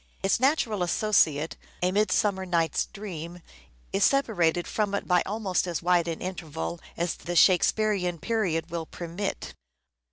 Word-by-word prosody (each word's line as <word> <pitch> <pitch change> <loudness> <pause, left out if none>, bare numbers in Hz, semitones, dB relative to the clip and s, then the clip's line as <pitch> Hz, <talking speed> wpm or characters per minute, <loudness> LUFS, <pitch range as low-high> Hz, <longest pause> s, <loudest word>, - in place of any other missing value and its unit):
Its 195 - +2
natural 255 - +1
associate, 170 -5 +2 0.3
"A 180 - +3
Midsummer 200 -1 +1
Night's 170 -4 0
Dream," 175 -4 -8 0.5
is - - +2
separated 175 -11 +2
from 205 -2 -1
it - - -4
by 180 -1 +4
almost 195 -3 -1
as 170 -1 -3
wide 175 -1 +3
an 165 -1 -4
interval 155 - -5 0.2
as 170 +1 0
the 175 - -6
Shakespearean 185 0 +3
period 170 -5 -1
will 165 -2 -4
permit. 175 +4 -5
180 Hz, 135 wpm, -27 LUFS, 170-205 Hz, 0.5 s, by